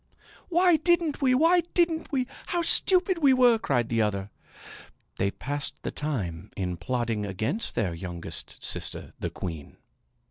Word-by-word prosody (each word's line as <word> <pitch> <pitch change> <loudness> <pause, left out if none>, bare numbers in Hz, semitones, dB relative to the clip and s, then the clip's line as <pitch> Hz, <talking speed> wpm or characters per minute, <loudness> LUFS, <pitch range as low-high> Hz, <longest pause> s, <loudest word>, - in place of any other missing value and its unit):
"Why 350 -1 +4
didn't 330 -2 +1
we! 255 -2 +4
Why 335 +6 +4
didn't 330 -2 +1
we! 260 -3 0 0.2
How 345 -1 0
stupid 365 +1 +4
we 280 -4 +5
were!" 245 -3 +5
cried 120 - 0
the 115 -1 +1
other. 100 -1 -1 0.9
They 100 - +1
passed 145 +7 -3
the - - -3
time 105 - -4
in 90 -2 -2
plotting 120 -3 -2
against 110 - -3
their 95 -6 0
youngest 85 0 -7
sister, - - -4
the - - -2
queen. 80 -5 -7
145 Hz, 145 wpm, -27 LUFS, -, 0.9 s, we